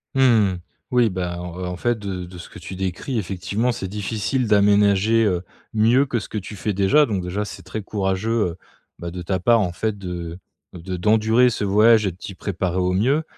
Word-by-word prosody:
Mmh. 115 -8 +4 0.4
Oui, 120 -2 +4
bah, 90 -2 -3
heu, 90 +1 -6
en 90 0 -4
fait, 120 +4 0
de 95 -4 -5
de 90 0 -11
ce 85 - -10
que - - -12
tu 95 - -8
décris 95 +7 -3
effectivement, 100 +5 -1
c'est 95 -5 -4
difficile 105 +5 -2
d'aménager, 105 +2 +4
heu, 90 -5 +1 0.3
mieux 115 +6 +4
que 125 -3 -1
ce - - -8
que 110 - -5
tu 105 +1 -7
fais 105 +2 -2
déjà. 100 +11 +4
Donc 100 -6 -2
déjà, 95 +4 -3
c'est - - -9
très 110 - -5
courageux, 95 +1 -2 0.2
heu, 85 - -11 0.4
bah, 85 - -5
de 90 +1 -6
ta 95 +1 -1
part, 115 +5 +4
en 90 - -1
fait, 105 +4 -2
de, 90 -3 -6 0.4
heu, 90 +1 -5
d'endurer 110 +5 +4
ce 110 - -3
voyage 105 +2 +5
et 95 - 0
de 90 - -16
t'y 95 - -8
préparer 90 -2 -2
au 90 0 +1
mieux. 130 +12 +2
100 Hz, 210 wpm, -22 LUFS, 90-110 Hz, 0.4 s, voyage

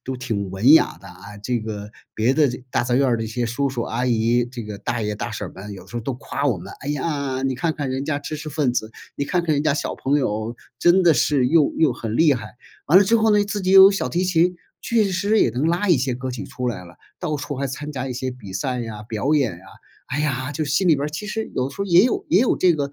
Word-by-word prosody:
都 130 0 -4
挺 110 -6 -3
文 100 +9 +4
雅 160 - +4
的 95 - -12
啊， 100 +3 -12
这 120 +3 -1
个 105 -2 -6 0.2
别 120 +5 +2
的 150 -3 +4
这 125 0 -6
大 - - +1
杂 120 0 -1
院 135 +2 +3
儿 120 - +2
的 115 - -3
一 - - -4
些 120 +2 -2
叔 140 +5 -1
叔 125 -3 -3
阿 120 +2 -2
姨， 120 +1 +2
这 120 0 -8
个 105 -1 -7
大 120 0 -3
爷 105 0 -2
大 - - -5
婶 - - -5
儿 - - -14
们 100 +2 -8
有 95 - -11
时 120 - -8
候 - - -1
都 135 +4 -3
夸 140 +3 -3
我 120 -9 +1
们：” 85 - -10
哎 140 - -6
呀， 140 -3 -2
你 135 -1 0
看 160 +5 -1
看 140 -3 -3
人 130 +1 -2
家 145 -1 -1
知 155 +1 -6
识 150 +1 -7
分 145 -4 0
子， 110 -2 -2 0.3
你 140 - -1
看 175 +4 0
看 160 -3 +1
人 145 - 0
家 155 -1 +2
小 145 - -2
朋 140 +2 0
友 110 -3 -2 0.2
真 175 +2 +4
的 170 -3 +5
是 140 -3 +2
又 150 +2 +3
又 160 - +4
很 115 0 -4
厉 155 -4 +5
害。 110 0 -8 0.3
“完 170 +6 +8
了 200 - +5
之 225 +4 +3
后 220 0 +3
呢， 205 - +4
自 205 0 -4
己 185 - 0
又 190 0 +10
有 195 - +8
小 200 - -2
提 180 +2 0
琴， 180 0 +2 0.3
确 230 -2 +2
实 200 +4 +1
也 - - +4
能 130 +6 -1
拉 175 +5 0
一 175 - +5
些 130 0 -1
歌 130 +1 -5
曲 125 -2 -6
出 125 - -5
来 90 -6 -5
了， 85 0 -15 0.2
到 155 -4 -2
处 145 -1 -5
还 140 - -2
参 145 +3 -6
加 135 -2 -4
一 - - -3
些 130 +1 -3
比 115 -7 -10
赛 125 +4 -2
呀、 110 -2 -6
表 115 +7 -1
演 135 -8 +2
呀。 85 +2 -13 0.4
哎 140 +3 -3
呀， 135 -2 -2
就 155 0 -2
心 150 +7 +1
里 165 - +6
边 140 0 -2
儿 - - -3
其 155 +8 -6
实 220 +1 -4
有 130 +2 -1
时 - - -13
候 200 - 0
也 175 -1 +6
有 245 - 0
也 180 - +4
有 240 +3 +2
这 180 -2 +4
个 140 -2 -2
135 Hz, 310 characters per minute, -22 LUFS, 120-160 Hz, 0.4 s, 又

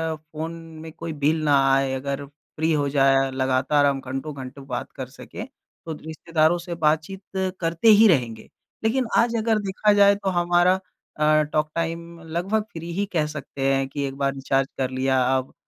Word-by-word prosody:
Phone 155 +1 -7 0.3
में 160 0 -8
कोई 165 0 -6
bill 155 +2 +3
ना 145 -2 +4
आए 135 0 +2
अगर 140 +1 -3
फ्री 155 +2 -4
हो 145 -2 +1
जाए 135 -1 +3
लगातार 130 +2 +2
हम 140 -1 +1
घंटों-घंटों 135 0 -6
बात 125 -2 -4
कर - - -5
सकें, - - -9 0.4
तो 160 - -4
रिश्तेदारों 160 +2 0
से 170 0 -6
बातचीत 160 +5 0 0.4
करते 165 +5 0
ही 220 +1 +8
रहेंगे। 120 - 0 0.3
लेकिन 250 +3 +1
आज 235 0 +3
अगर 220 -1 +1
देखा 205 +1 +1
जाए 200 0 +6
तो 195 -1 -2
हमारा 175 +1 +3 0.4
अ, 155 0 +4
टॉक 150 +1 -1
टाइम 165 0 -4
लगभग 180 +7 -1
फ्री 170 +1 -6
ही 200 +3 0
कह 155 -3 +2
सकते 145 -2 -8
हैं 135 0 0
कि 140 +1 -4
एक 135 - -6
बार 140 -1 0
रिचार्ज 135 0 0
कर 130 -1 0
लिया 130 0 +1 0.2
अब 130 0 -5
155 Hz, 175 wpm, -24 LUFS, 135-175 Hz, 0.4 s, ही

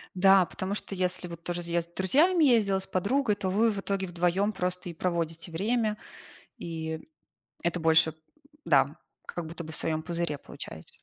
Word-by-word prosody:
Да, 195 0 +6
потому 185 +3 -4
что, 205 - -4
если 180 -1 -1
вот 170 -1 -10
тоже 175 0 -2
я 170 0 +2
с 170 - -7
друзьями 295 - +3
ездила, 215 -7 +4
с 190 - -1
подругой, 210 +5 +1
то 195 -2 -2
вы 215 +5 +3
в 205 - -4
итоге 195 -1 -1
вдвоём 180 +4 +1
просто 180 -2 -2
и - - -5
проводите 165 -1 -2
время, 215 +4 0 0.6
и 160 -1 -4 0.6
это 175 0 0
больше 160 -1 +4 0.5
Да, 140 +1 +3 0.3
как 175 -2 -5
будто 170 +2 -5
бы 160 - -8
в - - +2
своём 155 -1 0
пузыре 170 -3 -2
получаюсь. 80 -10 -11
180 Hz, 175 wpm, -28 LUFS, 165-200 Hz, 0.6 s, Да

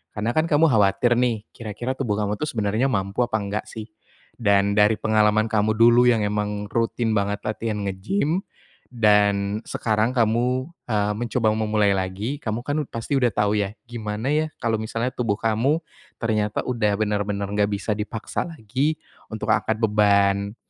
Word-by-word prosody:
karena 110 +2 -1
kan 160 +1 +1
kamu 155 +1 +4
khawatir 105 +3 +3
nih, 115 -4 0
kira-kira 115 +3 -5
tubuh 115 -6 0
kamu 105 0 -2
tuh 150 - -2
sebenarnya 110 +2 0
mampu 100 -3 -2
apa 110 - -3
enggak 100 0 -3
sih? 110 -2 -7 0.6
Dan 100 -1 +3
dari 105 +1 +4
pengalaman 110 0 +2
kamu 110 0 +2
dulu 120 +2 +6
yang 115 -3 +2
emang 105 0 -2
rutin 115 0 0
banget 100 0 -1
latihan 110 0 -2
nge-gym 145 - -1 0.5
dan 105 -3 +2
sekarang 110 +3 0
kamu, 120 +3 +1 0.2
eee, 105 -2 +1
mencoba 115 0 0
memulai 105 -2 +1
lagi, 95 +9 -3
kamu 110 0 -3
kan 145 +1 0
pasti 115 +5 -4
udah 125 - +4
tahu 105 0 +1
ya 100 - -2 0.2
gimana 115 +2 -4
ya 155 +1 +1
kalau 115 -2 -1
misalnya 115 +3 -2
tubuh 110 -5 -1
kamu 115 +7 +1 0.4
ternyata 105 -2 -1
udah 105 -5 0
benar-benar 105 -1 -1
nggak 105 0 +2
bisa 100 +1 -2
dipaksa 110 +8 -4
lagi 145 +2 -2 0.3
untuk 110 0 -2
angkat 110 0 0
beban. 100 -1 +2
110 Hz, 155 wpm, -23 LUFS, 105-120 Hz, 0.6 s, dulu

